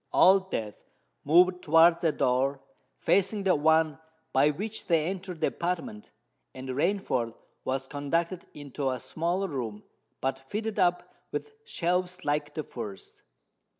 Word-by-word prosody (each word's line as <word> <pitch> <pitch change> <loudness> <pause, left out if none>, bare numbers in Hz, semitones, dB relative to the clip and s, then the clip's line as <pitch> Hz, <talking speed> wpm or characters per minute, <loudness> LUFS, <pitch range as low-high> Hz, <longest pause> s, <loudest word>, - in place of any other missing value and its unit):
Old 190 +1 +5
Death 105 - -5 0.3
moved 180 +4 +5
towards 165 +2 +5
a 165 - +4
door 135 0 +1 0.4
facing 200 +1 +1
the 190 -1 +4
one 160 0 +3 0.3
by 135 +3 +5
which 205 +9 -4
they 165 -3 +3
entered 180 -1 -5
the - - +4
apartment; 170 -12 -4 0.5
and 130 0 -7
Rainford 135 - 0 0.3
was 130 0 -1
conducted 165 +6 -2
into 140 -1 -3
a 130 -1 -2
smaller 170 +9 -1
room, 115 - -5 0.4
but 135 0 -1
fitted 210 +11 -4
up 175 0 +3 0.3
with 440 - -4
shelves 180 - -1
like 145 0 -1
the 155 - -2
first. 105 -7 -8
160 Hz, 135 wpm, -28 LUFS, 135-180 Hz, 0.5 s, Old